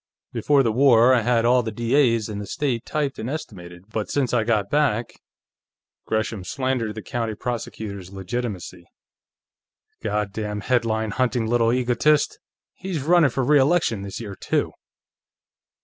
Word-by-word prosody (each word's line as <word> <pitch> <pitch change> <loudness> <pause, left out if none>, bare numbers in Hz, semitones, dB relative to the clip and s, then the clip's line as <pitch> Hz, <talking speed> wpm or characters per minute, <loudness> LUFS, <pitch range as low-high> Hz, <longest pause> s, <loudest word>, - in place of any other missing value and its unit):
"Before 145 -2 +3
the 115 - +1
war, 125 0 +5
I 125 - +3
had 115 0 +2
all 125 +1 +4
the 115 - -4
D.A.'s 115 0 +2
in 105 -2 -5
the 100 - -6
state 135 -8 -2
typed 145 -3 -2
and 115 - -4
estimated, 90 - -7
but 110 -1 -3
since 135 -4 0
I 120 -2 +3
got 110 -3 +1
back 130 -6 +1 0.5
" - - -66
Gresham 110 -2 -1
slandered 130 -1 -2
the 110 - -7
county 115 -3 -3
prosecutor's 105 -5 -5
legitimacy. 100 -2 -5 1.1
"God 105 -1 -2
damn 105 -1 -4
headline 110 -3 0
hunting 125 0 0
little 115 0 +2
egotist! 125 +4 +2 0.3
He's 180 -7 -4
running 170 -1 +5
for 130 +2 -1
re 145 +3 +5
election 135 - +2
this 100 0 -6
year, 105 -4 -6
too." - - -1
115 Hz, 150 wpm, -23 LUFS, 105-130 Hz, 1.1 s, war